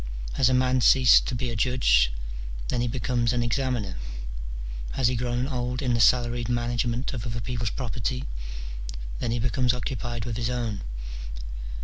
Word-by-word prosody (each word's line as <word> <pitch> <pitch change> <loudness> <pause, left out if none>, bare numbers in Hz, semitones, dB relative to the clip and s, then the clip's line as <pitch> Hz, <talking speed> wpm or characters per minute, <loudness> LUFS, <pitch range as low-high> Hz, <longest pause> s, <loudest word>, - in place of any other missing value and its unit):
Has 130 -2 +4
a 130 - +3
man 130 0 +3
ceased 130 +1 +7
to 130 - -1
be 120 0 -1
a - - -3
judge? 105 - +4 0.6
then 120 - +1
he 120 - +1
becomes 125 -1 0
an 120 -1 +1
examiner. 120 -5 -1 1.0
Has 125 -3 +3
he 125 - 0
grown 120 +1 0
old 125 -2 -2
in 125 -2 +2
the 115 - +2
salaried 120 0 +3
management 120 +1 0
of 120 -4 -4
other 115 0 -3
people's 115 -1 -2
property? 125 +2 -2 1.0
then - - -1
he 115 - +1
becomes 125 +1 +2
occupied 120 -2 -3
with 115 -2 -3
his 120 0 0
own. 115 -5 -2
120 Hz, 160 wpm, -27 LUFS, 115-125 Hz, 1.0 s, ceased